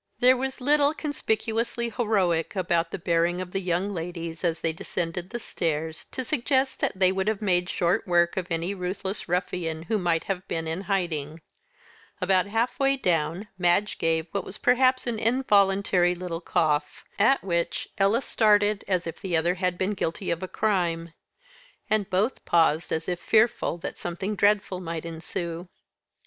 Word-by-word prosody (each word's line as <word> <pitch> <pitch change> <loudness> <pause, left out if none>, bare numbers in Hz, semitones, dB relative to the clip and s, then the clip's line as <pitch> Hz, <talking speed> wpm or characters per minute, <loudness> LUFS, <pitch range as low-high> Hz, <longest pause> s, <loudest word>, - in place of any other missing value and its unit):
There 255 +1 +6
was 265 +1 -3
little 290 +3 +3
conspicuously 235 -5 -1
heroic 195 -8 +1
about 170 -3 +1
the - - -4
bearing 170 +1 +1
of 185 -1 -5
the 195 - -1
young 185 +3 -1
ladies 165 -2 -5
as 165 -2 0
they 165 -1 0
descended 170 +2 -4
the 240 - -4
stairs 160 -7 -3
to 260 - -4
suggest 265 +1 0
that - - 0
they 185 -1 +4
would 190 +1 -1
have 215 -2 +1
made 180 -3 +1
short 175 +2 0
work 175 -1 +3
of 185 -2 -2
any 165 +3 -1
ruthless 190 +1 -4
ruffian 175 -3 -1
who 210 +5 0
might 170 -3 +1
have 190 -1 -4
been 165 0 -3
in 165 +4 -2
hiding. 165 -5 -1 0.8
About 185 -1 +2
halfway 255 +6 +1
down, 175 - 0
Madge 180 +4 +2
gave 160 -1 +1
what 200 -2 -2
was 190 - -8
perhaps 255 +1 +3
an 235 -3 -2
involuntary 200 -6 +3
little 175 -1 -5
cough; 150 -3 0
at 230 +7 +4
which 170 -3 -1
Ella 205 +6 +3
started 210 -2 +3
as 180 -3 0
if 165 - -6
the 185 -4 0
other 170 +2 +2
had 180 -1 -1
been 190 +3 0
guilty 180 0 -2
of 170 - -2
a 185 - -3
crime; 170 -6 -1 0.8
and 215 -2 +1
both 200 +7 0
paused 165 -1 +2
as 160 0 -2
if 180 -1 -2
fearful 220 -5 +2
that 170 - -6
something 180 +4 -3
dreadful 205 -2 +2
might 165 -2 -5
ensue. 170 +1 -5
185 Hz, 165 wpm, -26 LUFS, 170-210 Hz, 0.8 s, There